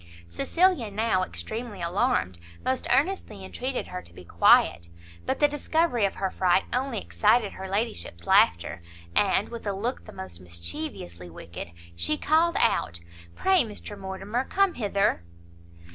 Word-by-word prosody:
Cecilia 300 - +1
now, 210 -2 +1
extremely 220 +3 -5
alarmed, 175 - 0 0.3
most 260 0 0
earnestly 275 - 0
entreated 255 +6 -3
her 180 0 -5
to 85 - -9
be 90 - -12
quiet; 85 0 +4 0.4
but - - 0
the 295 - +6
discovery 295 -4 +1
of 195 - -2
her 190 -1 -2
fright 185 0 +3
only 255 0 -1
excited 85 - +2
her 190 0 -7
ladyship's 200 - -2
laughter, 85 +1 +3 0.3
and, 200 0 +3
with 235 -2 -7
a 200 - 0
look 230 +7 -3
the - - -10
most 90 -2 -9
mischievously 85 - -5
wicked, 85 +1 -8 0.3
she 85 - 0
called 330 +2 +3
out 85 +1 +1 0.4
"Pray 380 -2 +4
Mr 210 -2 -5
Mortimer, 195 +5 -3
come 395 -2 +2
hither!" 200 - 0
200 Hz, 145 wpm, -26 LUFS, -, 0.4 s, the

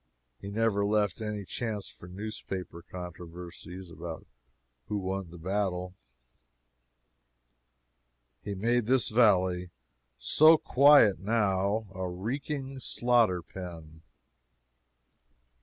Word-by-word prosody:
He 100 - -7
never 105 -1 +1
left 105 -2 +1
any 105 -2 -4
chance 110 -1 -4
for 90 - -12
newspaper 95 -3 -6
controversies 90 +1 -9
about 85 -1 -7 0.6
who 105 - -2
won 95 -2 -3
the 85 - -11
battle. 90 0 -2 2.5
He 100 - -5
made 115 +3 +1
this 130 0 +3
valley, 95 -6 +3 0.5
so 155 - +6
quiet 140 -8 +6
now, 105 0 +1
a 95 -1 -3
reeking 135 - -4
slaughter 120 -8 +2
pen. 80 -4 -9
100 Hz, 90 wpm, -29 LUFS, 90-110 Hz, 2.5 s, so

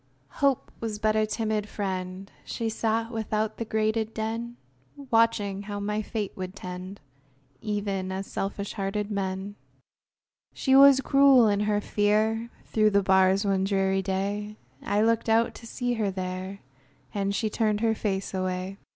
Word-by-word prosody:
Hope 275 -2 +2
Was 220 -2 -3
but 215 0 +1
a 215 0 +2
timid 215 -1 -2
friend; 190 -1 -4
She 230 -1 -3
sat 225 +1 -1
without 220 -1 -2
the 230 - -3
grated 220 0 0
den, 230 +2 -3 0.5
Watching 225 -4 +2
how 205 0 -5
my 210 +1 -1
fate 210 -2 -3
would 185 0 -6
tend, 185 +1 -7 0.6
Even 200 -3 -2
as 190 +1 -3
selfish 200 +1 -4
hearted 205 +1 -2
men. 195 0 -3 1.0
She 265 -1 +2
was 275 0 +8
cruel 275 -4 +6
in 205 -1 +2
her 210 0 +1
fear; 215 +3 +1 0.2
Through 215 -1 +3
the 200 -1 +2
bars 190 +1 +4
one 195 -1 +1
dreary 195 -1 +1
day, 200 +2 -3 0.2
I 205 +1 +1
looked 230 0 +1
out 225 +1 +3
to 230 - -11
see 245 +1 -2
her 215 -4 0
there, 185 +1 -5 0.5
And 200 -1 -1
she 215 +1 -1
turned 215 -2 +1
her 225 -1 +3
face 195 -3 -2
away! 185 +1 -3
210 Hz, 150 wpm, -27 LUFS, 195-225 Hz, 1.0 s, was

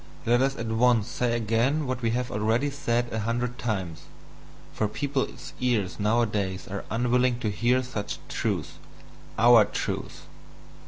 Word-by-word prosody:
Let 120 +2 +3
us 135 +1 +1
at 115 - -4
once 115 0 +3
say 120 -1 0
again 120 +7 +1
what 130 -1 -3
we 115 - +1
have 125 +2 -1
already 110 +7 +1
said 120 -4 -1
a 110 - -1
hundred 120 +3 -2
times, 95 -10 -3 0.7
for 110 - 0
people's 140 +5 -3
ears 110 -8 0
nowadays 105 -3 0
are 100 0 -5
unwilling 125 +1 +2
to 110 - 0
hear 125 +4 +2
such 120 -5 -4
truths - - -3 0.6
OUR 120 -1 +7
truths. - - -4
120 Hz, 145 wpm, -26 LUFS, 110-125 Hz, 0.7 s, OUR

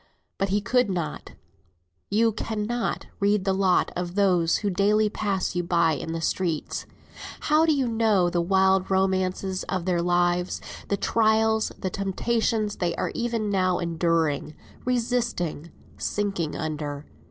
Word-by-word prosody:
But 195 - 0
he 205 +2 +1
could 250 +1 +2
not, 175 -4 -4 0.8
you 225 +2 +3
cannot, 220 +2 -2
read 200 -1 +2
the 195 - +2
lot 190 -1 +2
of 175 0 -4
those 180 -5 +3
who 200 - +2
daily 210 +3 +3
pass 195 -4 -2
you 175 - +1
by 170 -1 +2
in 160 +2 -3
the 165 0 -3
street. 165 -1 -2 0.5
How 310 +2 +3
do - - +5
you 270 -3 +1
know 220 -5 +2
the 175 0 0
wild 190 +1 +3
romances 190 0 0
of 185 -3 -3
their 180 -2 +1
lives; 175 0 +1 0.3
the 200 - 0
trials, 220 0 +2
the 185 - -3
temptations 215 +2 -1
they 175 -2 -1
are - - -2
even 230 -3 -1
now 185 -2 +2
enduring, 165 -3 0 0.3
resisting, 235 -10 -1 0.3
sinking 200 -7 -2
under? 150 -2 -4
190 Hz, 140 wpm, -25 LUFS, 175-215 Hz, 0.8 s, do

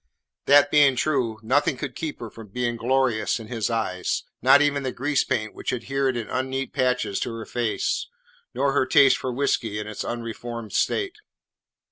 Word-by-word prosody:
That 145 +1 +6
being 145 -3 +5
true, 125 -5 0
nothing 135 +3 +2
could 130 -1 -5
keep 155 -2 -5
her 115 -3 -6
from 115 -2 -11
being 120 +3 -2
glorious 120 -2 +1
in 110 -1 -10
his 115 -3 -2
eyes, 110 -6 -1 0.2
not 135 +3 +7
even 145 -1 +2
the 130 -1 -2
grease 140 +3 0
paint 110 -5 -2
which - - -4
adhered 130 +1 -1
in 115 - -4
unneat 130 0 -3
patches 125 -5 0
to - - -3
her 115 -1 -6
face, 120 -3 -1 0.4
nor 140 - +1
her 130 - +1
taste 135 0 +6
for 130 - -3
whiskey 120 -5 -1
in 105 - -4
its 110 -1 -5
unreformed 115 -1 -6
state. 400 +1 0
125 Hz, 175 wpm, -24 LUFS, 115-135 Hz, 0.4 s, not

